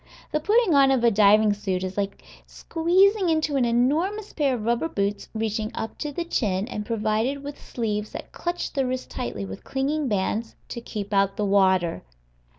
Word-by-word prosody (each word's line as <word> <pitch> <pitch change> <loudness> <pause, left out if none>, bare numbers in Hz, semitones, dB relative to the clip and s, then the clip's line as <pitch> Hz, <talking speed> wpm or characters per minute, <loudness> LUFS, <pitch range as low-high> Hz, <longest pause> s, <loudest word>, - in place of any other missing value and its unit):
The 305 - +1
putting 420 +2 +3
on 275 -1 +6
a 240 -3 +4
diving 210 0 +5
suit 190 -3 -2
is 185 0 -4
like 200 -1 -3 0.2
squeezing 370 +4 +2
into 315 -2 +1
an 260 -3 +3
enormous 315 - +1
pair 280 -4 +1
of 220 -3 -5
rubber 235 +8 +1
boots 200 -6 -2
reaching 220 -1 -1
up 220 - -5
to 295 - -3
the 340 +4 -3
chin, 205 - 0
and 210 - -4
provided 225 +5 0
with 285 0 -8
sleeves 210 -3 -3
that - - -7
clutch 350 0 -3
the 270 -2 0
wrists 255 0 -3
tightly 110 -5 -5
with 95 0 -8
clinging 280 +2 -1
bands, 215 +2 -1
to 235 - -5
keep 210 -3 -6
out 195 0 +2
the 210 - 0
water. 190 -4 +3
235 Hz, 180 wpm, -25 LUFS, 205-290 Hz, 0.2 s, on